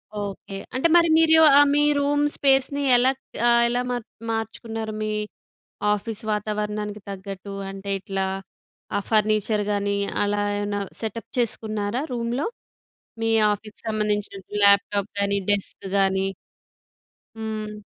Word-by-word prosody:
Okay. 200 -1 -5 0.2
అంటే 265 +6 +3
మరి 340 -1 +6
మీరు 325 0 +5 0.4
మీ 295 - +4 0.2
రూమ్ 290 +1 +2
స్పేస్‌ని 275 0 +2
ఎలా 255 +2 +4 0.4
ఆహ్, 235 0 +5
ఎలా 245 +1 0
మార్ 245 -3 -3 0.3
మార్చుకున్నారు? 225 0 -4
మీ 215 - -1 0.8
ఆఫీస్ 210 +2 -4
వాతావరణానికి 210 0 -3
తగ్గట్టు 195 0 -7 0.2
అంటే 195 +1 -6
ఇట్లా 195 0 -2 0.7
ఆ - - +2
ఫర్నిచర్ 215 -1 +2
గాని 200 0 0 0.3
అలా 205 0 0 0.2
ఏమన్నా 205 0 -2 0.2
సెటప్ 225 0 -5
చేసుకున్నారా 215 -1 -1
రూమ్‌లో? 240 +3 -1 0.8
మీ 225 - +1 0.2
ఆఫీస్‌కి 210 +1 -8
సంబంధించినటువంటి 210 -2 -2
ల్యాప్‌టాప్ 200 0 +4
కానీ, 200 0 +1
డెస్క్ 200 -1 -2
కానీ. 190 0 +2 1.1
హ్మ్. 215 -1 -5
210 Hz, 115 wpm, -24 LUFS, 205-230 Hz, 1.1 s, మరి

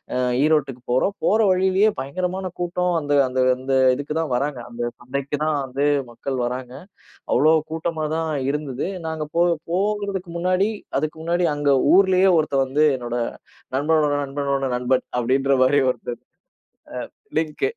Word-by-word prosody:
அ, - - 0 0.3
ஈரோட்டுக்கு 140 -5 +1
போறோம். 130 +11 +1
போற 220 - +3
வழியிலே 190 +3 +3
பயங்கரமான 180 +6 -3
கூட்டம் 180 +1 0
அந்த 145 -1 0
அந்த 130 0 -1 0.2
அந்த 135 +1 -1 0.2
இதுக்குதான் 150 +1 -2
வராங்க. 140 0 -1
அந்தச் 120 0 -4
சந்தைக்குதான் 140 +4 -2
வந்து 135 +3 -2 0.3
மக்கள் 130 +2 -4
வராங்க. 125 0 -5 0.6
அவ்வளோ 155 +2 +5 0.2
கூட்டமா 160 -1 -2
தான் 160 -1 -2 0.2
இருந்தது. 145 0 -3 0.2
நாங்க 160 -1 -3
போ 170 - +5 0.3
போங்கறதுக்கு 200 -2 -1
முன்னாடி 185 +3 +2 0.3
அதுக்கு 155 +2 -3
முன்னாடி 175 +1 +1
அங்க 145 -1 +1 0.2
ஊர்லயே 190 -1 +5
ஒருத்தன் 140 -3 +1
வந்து 145 +4 +2
என்னோட 120 -1 -4 0.6
நண்பனோட 150 +1 +2
நண்பனோட 140 0 -2
நண்பன் 125 +1 0
அப்படின்ற 135 +3 +2
மாதிரி 140 +2 +4
ஒருத்தர் 120 -1 -7
அ, - - -62 1.1
லிங்க். 155 -1 -2
150 Hz, 135 wpm, -22 LUFS, 135-175 Hz, 1.1 s, அவ்வளோ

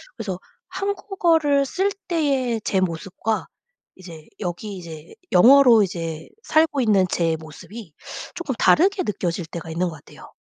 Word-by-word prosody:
그래서 195 -6 -5 0.3
한국어를 350 -7 +1
쓸 385 +8 0 0.2
때의 270 -9 0
제 190 - 0
모습과 185 +5 -2 0.5
이제 165 -4 -12
여기 195 +2 -5
이제 165 -3 -10 0.2
영어로 245 +1 +7
이제 165 -4 -5
살고 315 -2 +2
있는 205 -5 +3
제 165 -2 0
모습이 160 +4 -11 0.4
쪼끔 345 -7 -4
다르게 380 - +3
느껴질 180 -4 -3
때가 165 0 -8
있는 175 +2 -1
것 160 - -9
같아요. 145 - -15
210 Hz, 280 characters per minute, -22 LUFS, 170-285 Hz, 0.5 s, 영어로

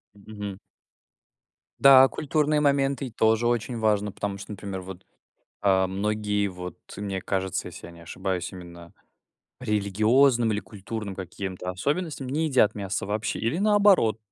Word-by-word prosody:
Мгм. 105 -1 -8 1.2
Да, 135 -1 +8
культурные 150 +1 0
моменты 140 -2 +1
и - - -10
тоже 110 +1 +2
очень 120 0 -1
важно. 105 -2 +1
Потому 100 0 -4
что, 100 - -9
например, 100 -2 -6
вот, 95 0 -10 0.6
а, 95 -1 +3
многие- 105 +1 -1
вот 90 -2 -8 0.2
мне 100 -2 -4
кажется, 95 0 -2
если - - -10
я - - -11
не 85 0 -15
ошибаюсь- 90 +1 -4
именно 85 -2 -11 0.7
по 130 - -11
религиозным 110 +4 +3
или 105 - -1
культурным 105 0 -7
каким-то 95 0 -5
особенностям 145 - -3
не 150 +5 0
едят 125 -7 +3
мясо 100 -1 -3
вообще 105 +1 -2
или, 115 +9 -1
наоборот 200 - +4
105 Hz, 140 wpm, -26 LUFS, 95-125 Hz, 1.2 s, Да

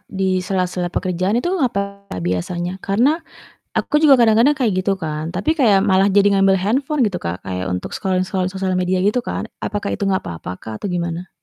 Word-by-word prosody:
di 190 -1 0
sela-sela 180 -1 -1
pekerjaan 185 +5 0
itu 350 +8 -1
apa 200 -5 -2 0.2
biasanya, 175 - -2
karena 250 - +2 0.6
aku 300 - +1
juga 285 -3 +7
kadang-kadang 235 +5 +4
kayak 240 -7 +1
gitu 195 - +2
kan. 155 -2 -4
Tapi 200 - +1
kayak 210 -8 +5
malah 190 +1 +4
jadi 200 0 +4
ngambil 195 0 +4
handphone 265 - 0
gitu, 190 -4 -1
Kak, 90 +3 -5
kayak 95 0 -3
untuk 90 -1 -4
scrolling-scrolling 185 0 -1
sosial 190 -1 -2
media 185 0 +1
gitu 210 +5 +2
kan. - - -4
Apakah 205 -1 -3
itu 205 - -2
nggak 190 -1 +1
apa-apa, 85 +1 -6
Kak, 110 - -8
atau - - 0
gimana? 170 0 -3
190 Hz, 185 wpm, -19 LUFS, 180-210 Hz, 0.6 s, juga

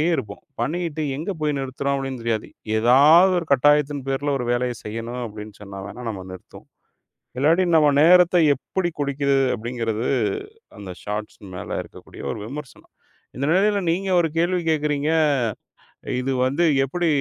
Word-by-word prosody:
இருப்போம். 100 -6 -6 0.2
பண்ணிக்கிட்டு 160 +3 -2
எங்க 170 +6 -3
போய் 150 -2 0
நிறுத்துறோம் 140 +1 -2
அப்படின்னு 135 -2 -5
தெரியாது. 115 -2 -2 0.3
ஏதாவது, 150 +10 +6
ஒரு 165 - -8
கட்டாயத்தின் 145 0 +2
பேர்ல 140 +1 -1
ஒரு 120 - -3
வேலைய 120 0 -1
செய்யணும் 115 +3 -5
அப்படின்னு 105 -1 -10
சொன்னா 100 -1 -9
வேனா, 125 - -9
நம்ம 95 -4 -6
நிறுத்துவோம். 95 - -13 0.7
இல்லாட்டி 160 +7 +3
நம்ம 150 -1 +5
நேரத்த 180 +2 +6 0.2
எப்படி 175 +6 -3
குடிக்கிது 140 -1 +1 0.2
அப்படிங்கறது 115 -1 -3 0.7
அந்த 100 -2 -8
ஷார்ட்ஸ் 105 +1 -5 0.2
மேல 90 - -5
இருக்கக்கூடிய - - -14
ஒரு - - -6
விமர்சனம். 140 +3 -10 0.4
இந்த 140 - -2
நிலையில 200 +4 +3
நீங்க 190 +3 -1
ஒரு 165 - +1
கேள்வி 175 +2 +1
கேக்குறீங்க, 150 -1 0 1.1
இது 130 +1 -2
வந்து 140 +7 0 0.2
எப்படி 170 +6 -1
140 Hz, 140 wpm, -22 LUFS, 120-160 Hz, 1.1 s, ஏதாவது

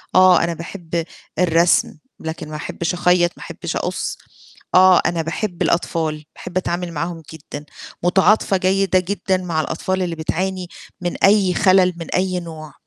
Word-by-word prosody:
آه 185 -2 +6
أنا 170 0 0
باحب 170 0 -4 0.4
الرسم 170 -2 +3 0.2
لكن 160 -1 -6
ما 155 - -6
أحبش 165 +2 -3
أخيَّط، 175 -1 +3
ما - - -10
أحبش - - -6
أقُصّ، - - -3 0.6
آه 185 0 +7
أنا 170 -1 +1
باحب 175 +2 -4
الأطفال، 160 -3 0
باحب 180 - -6
أتعامل 175 -1 -2
معاهم 165 +1 -4
جدًا، 145 -1 -9 0.4
متعاطفة 195 +2 +3
جيدة 185 0 +2
جدًا 190 0 -1
مع 170 -4 -1
الأطفال 185 +4 -2
اللي 170 -2 -2
بتعاني 180 +3 -2 0.3
من 175 -1 -4
أي 195 -2 +5
خَلَل، 185 -2 +4
من 165 - -7
أي 185 0 0
نوع، 160 -3 -9
175 Hz, 150 wpm, -20 LUFS, 165-185 Hz, 0.6 s, آه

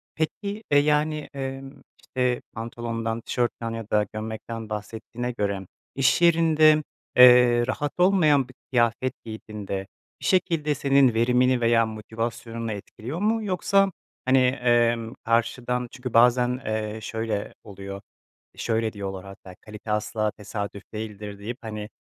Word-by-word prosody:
Peki, 200 +7 -3
eee, 145 - +6
yani, 150 +1 +1
emm, 135 0 -5 0.3
işte, 125 -1 -1
pantolondan, 115 0 -4
tişörtten 120 -1 -2
ya 115 -1 -6
da 105 0 +2
gömlekten 110 +1 -6
bahsettiğine 115 +3 -5
göre, 100 -4 -2 0.3
iş 135 +5 +2
yerinde, 160 -2 +5 0.3
eee, 125 -1 +7
rahat 145 +2 -2
olmayan 155 -8 +4
bir 130 - -15 0.2
kıyafet 120 +1 +1
giydiğinde, 105 -3 -6 0.3
bir - - -10
şekilde 165 -5 +2
senin 135 -3 +4
verimini 125 +2 +3
veya 115 -1 +4
motivasyonunu 115 +1 -4
etkiliyor 110 - -7
mu? 220 +1 +1
Yoksa, 195 +1 +2 0.3
hani, 130 +1 +4
emm, 120 -2 +2
karşıdan, 120 +1 0
çünkü 125 -2 -7
bazen, 125 +2 +4
eee, 110 0 -2
şöyle 110 -2 -3
oluyor, 100 -1 -8 0.6
şöyle 110 -1 -1
diyorlar, 95 -2 -6
hatta 95 -1 -12
kalite 105 0 -8
asla 105 0 0
tesadüf 100 -1 -6
değildir 105 -2 -6
deyip, 120 +5 -5
hani, 105 -1 -6
120 Hz, 125 wpm, -25 LUFS, 110-135 Hz, 0.6 s, eee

